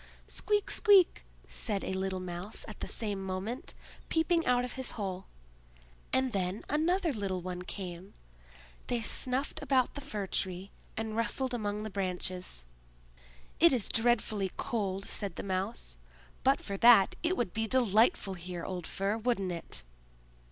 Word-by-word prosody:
"Squeak! 415 -1 0
squeak!" 395 - +5 0.2
said 195 - -1
a - - -2
little 190 0 -1
Mouse 180 +3 -4
at 215 - -9
the - - -4
same 205 -4 -1
moment, 195 - -4 0.3
peeping 330 +1 +3
out 250 0 +3
of 250 - -5
his 260 -1 -3
hole. 190 -3 -4 0.8
And 260 -1 +2
then 190 +1 -1
another 330 +3 +2
little 195 -5 -2
one 180 0 -4
came. 180 0 -7 0.7
They 240 -2 0
snuffed 255 +5 0
about 260 -2 +2
the 285 - -6
Fir 215 -7 -4
tree, 190 0 -2 0.3
and 220 -1 -2
rustled 250 +3 +1
among 210 -2 -2
the 215 - -5
branches. 185 - -3 0.9
"It 340 -2 +7
is 240 -6 +1
dreadfully 225 -4 +2
cold," 195 -4 -2
said 200 -2 -3
the - - -5
Mouse. 190 - -3 0.5
"But - - +4
for 200 - -4
that, 230 -3 +7
it 345 +3 +1
would 235 -7 -1
be 220 0 0
delightful 225 - +3
here, 175 -1 -6
old 180 -3 -4
Fir, 200 +3 -1
wouldn't 215 -5 0
it?" 170 -1 -3
210 Hz, 150 wpm, -31 LUFS, 185-245 Hz, 0.9 s, It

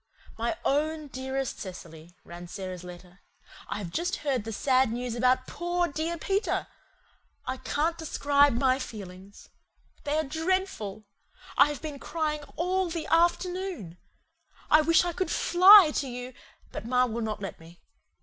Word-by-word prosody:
"My 230 +1 -2
OWN 305 +1 0
DEAREST 265 0 -4
Cecily," 170 -3 -10
ran 175 +1 -10
Sara's 185 -1 -7
letter. 180 +1 -12 0.5
"I - - -4
have 190 -5 -6
just 345 - -1
heard 260 -7 0
the 225 - -4
sad 255 +2 +2
news 245 0 -3
about 255 +2 +2
POOR 350 +2 -1
DEAR 320 +4 -3
PETER. 395 +6 -1 0.8
I 255 +1 -3
can't 305 +6 -1
describe 285 -3 +3
MY 255 +2 +2
FEELINGS. 195 -5 -10 0.5
They 295 +1 -1
are 315 - +1
DREADFUL. 320 - -2 0.5
I 280 - +6
have 295 0 -6
been 295 -3 -6
crying 305 -1 -2
ALL 365 +1 0
THE 330 -1 -4
AFTERNOON. 345 - 0 0.7
I 310 - +7
wish 330 +3 +4
I 350 - -2
could 370 0 -2
FLY 365 -1 +7
to 280 - -1
you, 250 0 -7 0.4
but - - -6
ma 250 +2 +2
will 235 -1 -4
not 215 -1 -3
let 195 -3 -7
me. 165 +1 -16
270 Hz, 150 wpm, -28 LUFS, 215-330 Hz, 0.8 s, I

